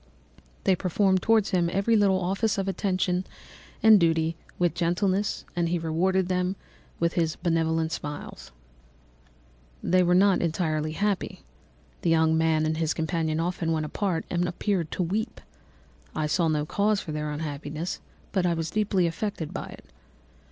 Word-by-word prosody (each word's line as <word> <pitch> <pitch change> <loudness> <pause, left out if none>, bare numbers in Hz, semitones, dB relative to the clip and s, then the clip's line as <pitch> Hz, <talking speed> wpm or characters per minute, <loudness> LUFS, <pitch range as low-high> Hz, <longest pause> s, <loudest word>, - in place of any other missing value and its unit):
They 190 - +4
performed 190 +1 +1
towards 225 -2 +3
him 175 -3 +2
every 200 +5 +2
little 195 -3 +4
office 195 +4 0
of 195 0 -1
affection 185 -1 0 0.6
and 220 -2 +8
duty 165 -1 +2 0.2
with 175 -3 +2
gentleness, 185 +4 0
and 170 -1 +1
he 175 - +1
rewarded 175 +3 +1
them 180 +1 0 0.4
by 170 - +3
his 165 -1 0
benevolent 165 -2 0
smiles. 145 -2 -6 1.3
"They 185 +1 +3
were 180 0 +3
not 195 +1 +4
entirely 155 -2 -1
happy. 205 +2 -2 0.6
The 170 - +1
young 160 -1 +4
man 160 -1 +2
and 155 0 0
his 160 -1 0
companion 160 -1 -1
often 170 -1 -1
went 155 -1 0
apart 180 +1 -2
and 175 0 +1
appeared 175 -2 -1
to 185 - 0
weep. 210 +7 -2 0.8
I 155 - 0
saw 165 +2 +1
no 150 -1 0
cause 205 +5 +1
for 160 - -6
their 150 0 -3
unhappiness, 150 +2 -4 0.3
but 190 -3 +1
I 170 - +1
was 165 -1 -3
deeply 205 -4 +1
affected 170 -1 -3
by - - -5
it. - - -12
175 Hz, 155 wpm, -26 LUFS, 160-190 Hz, 1.3 s, and